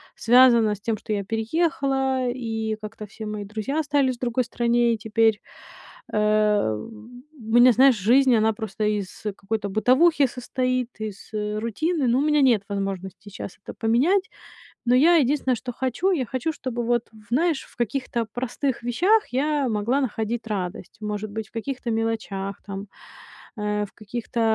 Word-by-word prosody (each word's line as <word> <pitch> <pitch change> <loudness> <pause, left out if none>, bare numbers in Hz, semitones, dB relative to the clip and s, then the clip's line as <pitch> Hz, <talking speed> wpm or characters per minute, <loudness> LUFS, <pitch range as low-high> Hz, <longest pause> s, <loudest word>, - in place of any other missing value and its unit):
связано 235 -3 +5
с 200 - -18
тем, 220 -1 -1
что 215 - -8
я 200 -1 -2
переехала, 265 - 0
и 225 -3 -3
как-то 215 0 -7
все 220 +2 -9
мои 210 -1 -4
друзья 215 +8 -3
остались 280 -4 +1
в - - -40
другой 245 0 0
стране. 235 0 +2
И - - -8
теперь, 220 0 +1 0.7
э, 210 - +2
у 235 - -10
меня, 245 +1 +8
знаешь, 260 +2 +6
жизнь, 245 +5 +4
она 220 0 +3
просто 215 -1 -5
из 205 -2 -3
какой-то 205 0 -3
бытовухи 270 - +4
состоит, 255 0 -2
из 210 -2 -7
рутины, 230 - -1
но 240 +2 +3
у - - +2
меня 300 0 +3
нет 240 -7 +4
возможности 195 0 -4
сейчас 195 -1 -8
это - - -8
поменять. 295 - +2 0.6
Но 245 - +4
я 330 +6 +6
единственное, 275 -3 +2
что 245 +2 -6
хочу, 260 +9 -1
я 275 -9 0
хочу, 260 +5 -2
чтобы 255 -5 -4
вот, 240 0 0 0.2
знаешь, 310 +3 +1
в - - -21
каких-то 240 0 -2
простых 255 +1 -2
вещах 365 - +2
я 285 +1 0
могла 230 +5 0
находить 225 -1 -3
радость. 190 -5 -4
Может 210 0 -4
быть, 215 0 -5
в - - -34
каких-то 245 +1 -4
мелочах, 220 -3 -3
там, 200 0 -6 0.7
э, 210 0 -1
в - - -22
каких-то, 235 +3 -5
235 Hz, 160 wpm, -24 LUFS, 215-260 Hz, 0.7 s, меня